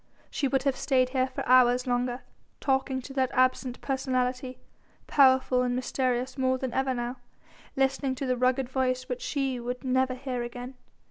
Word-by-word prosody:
She 280 - 0
would 265 0 0
have 275 -2 +1
stayed 255 -2 +1
here 260 0 +1
for 260 - -6
hours 250 0 +5
longer, 245 0 -1 0.4
talking 265 -1 0
to 270 - -9
that 260 -2 +1
absent 255 0 +1
personality, 255 -1 -1 0.5
powerful 260 -2 +4
and 250 -1 0
mysterious 255 +1 -1
more 260 0 +2
than 255 -2 -4
ever 265 -1 0
now, 240 +1 -3 0.6
listening 270 0 0
to 270 - -4
the 255 -1 +1
rugged 255 +1 +1
voice 255 0 -1
which 250 -1 -4
she 270 -3 -2
would 245 +2 -5
never 260 0 +1
hear 255 -1 -4
again. 245 +2 -6
255 Hz, 170 wpm, -28 LUFS, 250-265 Hz, 0.6 s, hours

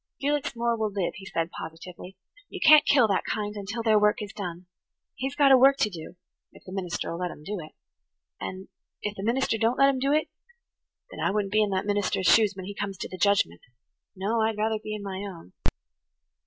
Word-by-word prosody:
"Felix 285 -3 -1
Moore 235 0 +1
will 220 -2 -1
live," 195 -3 -2
he 190 +1 -10
said 165 -1 -2
positively, 175 +3 -9 0.3
"You - - -7
can't 305 -1 +7
kill 260 -5 +5
that 195 - +1
kind 210 -1 -3
until 205 +3 -4
their 220 -2 +4
work 210 0 +3
is 205 -2 -6
done. 180 -3 -6 0.5
He's 270 +2 -4
got 280 -2 +5
a 265 - +9
work 275 +2 +6
to 210 - +1
do–if 175 +1 -13
the 185 - -10
minister'll 180 -2 -3
let 180 0 -1
him 150 - -11
do 205 +3 -4
it. 155 -1 -10 0.7
And–if 190 +2 -7
the 195 - -6
minister 235 0 +1
don't 230 +3 +2
let 275 0 +6
him 270 -2 0
do 275 +2 +1
it, 310 +2 +2 0.8
then - - -9
I - - +1
wouldn't 200 0 -1
be 215 - +4
in 210 - +2
that 190 0 -1
minister's 205 -2 0
shoes 210 +2 +5
when 190 -1 -7
he 205 - -6
comes 200 -1 -4
to - - -5
the 185 - -7
judgment–no, 190 - -1
I'd 220 -1 0
rather 220 +1 0
be 215 - -4
in 210 - -7
my 195 -1 -5
own. 185 - -8
205 Hz, 210 wpm, -27 LUFS, 185-225 Hz, 0.8 s, a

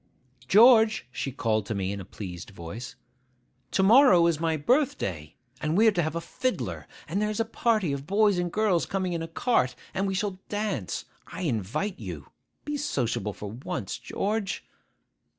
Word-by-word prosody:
'George,' 220 - +6
she 135 - -3
called 110 -4 0
to 110 - -2
me 95 -1 -1
in 100 - -4
a - - -6
pleased 90 -3 -8
voice, 100 +6 -8 0.7
'to 190 - +1
morrow 220 -5 +7
is 170 -3 +2
my 165 -1 0
birthday; 140 - 0 0.3
and 155 +3 0
we 220 - +5
are - - +7
to 175 - 0
have 160 0 -2
a - - 0
fiddler, 255 +9 -3 0.2
and 200 - -1
there's 210 +1 -1
a 225 - +2
party 220 -8 +1
of 140 +1 -5
boys 205 -1 +3
and 175 -1 -1
girls 210 -5 +1
coming 185 -2 -1
in 165 - -2
a 165 - -4
cart, 165 - +1 0.2
and 195 +1 0
we 195 - -1
shall 195 -1 -2
dance. 205 - -2 0.2
I - - -7
invite 125 - -2
you. 85 - -8 0.3
Be 295 0 -2
sociable 120 - -1
for 105 0 -7
once, 110 -4 -5
George. 205 -1 -2
170 Hz, 175 wpm, -27 LUFS, -, 0.7 s, morrow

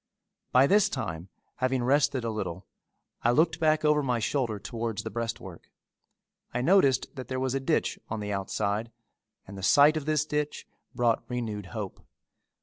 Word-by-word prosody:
By 130 +2 +6
this 210 +6 +4
time 85 - -4 0.3
having 130 -1 0
rested 140 0 +2
a 115 - -1
little, 95 -4 -4 0.6
I 120 - +2
looked 160 +6 +3
back 155 -1 +2
over 150 0 +4
my 125 -3 0
shoulder 115 -1 -1
towards 115 0 -4
the - - -5
breastwork. 110 -6 -5 0.8
I 120 - -1
noticed 150 -6 +3
that 130 -2 -7
there 130 0 -3
was 130 -1 -1
a 135 - 0
ditch 155 +4 0
on 110 - -3
the 105 -1 -3
outside 100 +3 -2 0.5
and 100 - -10
the 95 - -7
sight 145 +9 +6
of 150 -1 -5
this 155 -1 +2
ditch 150 -1 -2 0.3
brought 120 -2 +2
renewed 110 -5 -4
hope. 105 -3 -6
125 Hz, 165 wpm, -28 LUFS, 110-145 Hz, 0.8 s, By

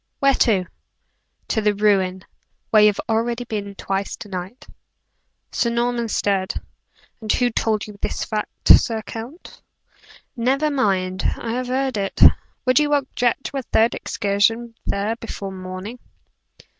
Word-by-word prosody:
"Where 275 0 +4
to?" 205 -8 +2 0.8
"To 220 - +1
the 210 -1 +2
ruin, 190 -3 +1 0.5
where 215 - +6
you 210 - +8
have 205 - +1
already 230 +2 0
been 205 -3 -5
twice 195 0 -3
to 220 -2 -10
night." 185 +6 -6 0.9
Sir 235 - +1
Norman 235 0 0
stared. 195 -3 0 0.7
"And 215 -1 -1
who 245 -1 +2
told 220 -1 0
you 210 -1 -12
this - - -2
fact, 215 -1 -4
Sir 225 -2 +6
Count?" 235 - -9 0.7
"Never 270 +5 +1
mind; 190 -8 0
I 230 - -4
have 250 +2 -2
heard 260 -1 -1
it. 195 -1 -3 0.5
Would 255 +1 +5
you 295 -1 +2
object 260 -3 0
to 280 - -4
a - - -1
third 230 -2 +2
excursion 225 +3 0
there 205 +3 -1
before 205 -4 -6
morning?" 185 +5 -7
225 Hz, 145 wpm, -22 LUFS, 200-245 Hz, 0.9 s, you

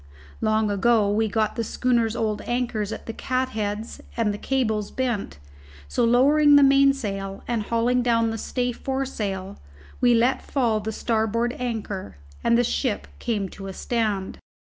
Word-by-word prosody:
Long 215 -1 +2
ago 205 0 +3
we 220 +2 +2
had 215 - -4
got 220 -1 +1
the 230 - -1
schooner's 235 -1 +1
old 215 -2 -1
anchors 240 -4 -1
at - - -6
the 225 - -5
catheads 220 -4 -3 0.2
and 220 -3 +1
the 205 - -6
cables 220 -6 0
bent, 240 - -2 0.5
so, 70 - 0
lowering 285 +5 +5
the 285 - +7
mainsail 270 -9 +2
and 235 -2 0
hauling 235 +3 +1
down 230 -2 +2
the 225 - -4
stay 245 +2 -1
foresail, 215 -8 -4 0.4
we 245 -1 +4
let 240 +3 +2
fall 235 -6 0
the 215 +1 -4
starboard 230 +3 0
anchor, 210 - -4 0.3
and 235 - +4
the 245 - +3
ship 245 -2 -1
came 210 -5 -1
to 195 +1 -9
a 190 - -6
stand. 210 -4 -2
230 Hz, 160 wpm, -24 LUFS, 210-245 Hz, 0.5 s, the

